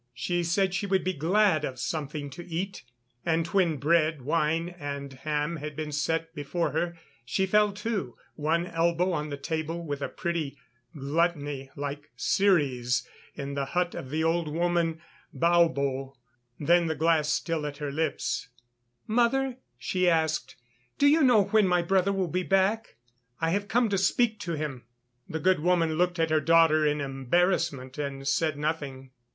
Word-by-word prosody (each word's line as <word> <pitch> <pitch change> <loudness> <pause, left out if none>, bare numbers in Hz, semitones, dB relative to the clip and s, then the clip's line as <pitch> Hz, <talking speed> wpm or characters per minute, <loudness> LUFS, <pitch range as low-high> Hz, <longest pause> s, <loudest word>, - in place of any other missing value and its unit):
She 175 +7 -1
said 180 +2 +1
she 200 +2 -1
would 190 -1 +1
be 185 - 0
glad 175 +1 +2
of 130 -3 -3
something 145 +1 -4
to 175 - -8
eat, 185 +3 -4 0.4
and 165 -1 +1
when 170 -3 +1
bread, 155 0 +2
wine 165 +3 +1
and 140 -1 -5
ham 150 +4 -2
had 150 0 -6
been 155 0 -4
set 165 +2 -1
before 160 +3 -2
her, 170 -1 -2 0.3
she 190 +10 0
fell 210 +2 +3
to, 205 - -3 0.2
one 160 +3 0
elbow 170 +1 +1
on 150 -3 -2
the 140 - -4
table, 160 +3 -3
with 145 -2 -4
a - - -2
pretty 170 -5 -3 0.4
gluttony, 145 -2 -1
like 145 +1 -5
Ceres 135 -11 +2 0.3
in 140 -1 -5
the 140 -1 -1
hut 180 -1 +1
of 130 - -7
the 155 +3 -1
old 165 0 +1
woman 165 +1 0 0.4
Baubo. 140 -6 +2 0.4
Then, 170 +3 +3
the 160 - -1
glass 160 -2 +2
still 160 -1 -1
at 145 -1 -7
her 145 -1 -4
lips: 150 -4 -2 0.6
"Mother," 245 +3 +1 0.2
she 185 -1 +1
asked, 160 -2 0 0.4
"do 285 - +3
you 300 +3 +5
know 245 -7 +6
when 205 0 +3
my 180 -1 +2
brother 190 +2 +2
will 190 -2 0
be 180 +3 -1
back? 195 +4 +1 0.4
I 165 0 +1
have 200 +2 -1
come 235 +2 +2
to 195 -1 +1
speak 215 +3 +2
to 175 -4 -4
him." 150 -5 -4 0.5
The 160 - -3
good 185 +1 +3
woman 165 -1 +2
looked 175 +2 +1
at 165 -1 +1
her 155 -1 +3
daughter 160 -1 +5
in 150 0 0
embarrassment 135 0 0
and 135 -1 -4
said 150 +2 +1
nothing. 140 -4 -3
165 Hz, 165 wpm, -28 LUFS, 145-180 Hz, 0.6 s, know